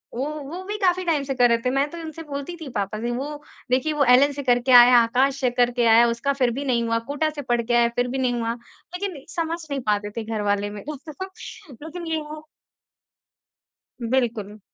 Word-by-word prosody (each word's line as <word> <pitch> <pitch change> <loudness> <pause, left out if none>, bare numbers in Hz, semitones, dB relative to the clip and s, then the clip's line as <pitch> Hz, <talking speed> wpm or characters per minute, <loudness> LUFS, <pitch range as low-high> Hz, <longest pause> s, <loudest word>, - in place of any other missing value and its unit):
वो 260 - -2 0.2
वो 355 +3 -6
भी 415 +2 -4
काफ़ी 370 -2 +1
टाइम 310 -4 +1
से 275 -1 -3
कर 245 -1 +4
रहे 235 - +4
थे। - - +3
मैं 275 +3 +1
तो 340 - -8
उनसे 325 -1 -7
बोलती 285 +3 -6
थी 300 - -6
पापा 200 +1 -2
से 240 +1 -2
वो 255 +3 -3 0.5
देखिए, 300 +5 +1
वो 290 -1 +2
एलेन 280 +3 +5
से 285 0 -5
करके 245 0 +2
आया, 245 0 +9
आकाश 260 +4 +2
से 255 - +3
करके 245 0 +1
आया, 230 +1 +6
उसका 235 +4 -1
फिर 255 -3 +1
भी 275 +4 -4
नहीं 240 -3 +1
हुआ 230 0 0
कोटा 300 +2 0
से 300 -1 -6
पढ़ 240 -3 0
के 240 +1 -2
आया, 235 0 +5
फिर 245 0 +1
भी 260 +2 -3
नहीं 250 -2 +1
हुआ। 230 -1 -1
लेकिन 335 +6 -8
समझ 335 0 -1
नहीं 280 -1 -2
पाते 205 0 0
थे 230 - -2
घर 220 -1 -3
वाले 205 0 -1
मेरे 210 +9 -7
को 305 +6 -8 0.6
लेकिन 340 +2 -7
ये 320 - +1 0.2
है 310 - -8 1.6
बिल्कुल। 225 -4 -1
255 Hz, 220 wpm, -23 LUFS, 235-295 Hz, 1.6 s, आया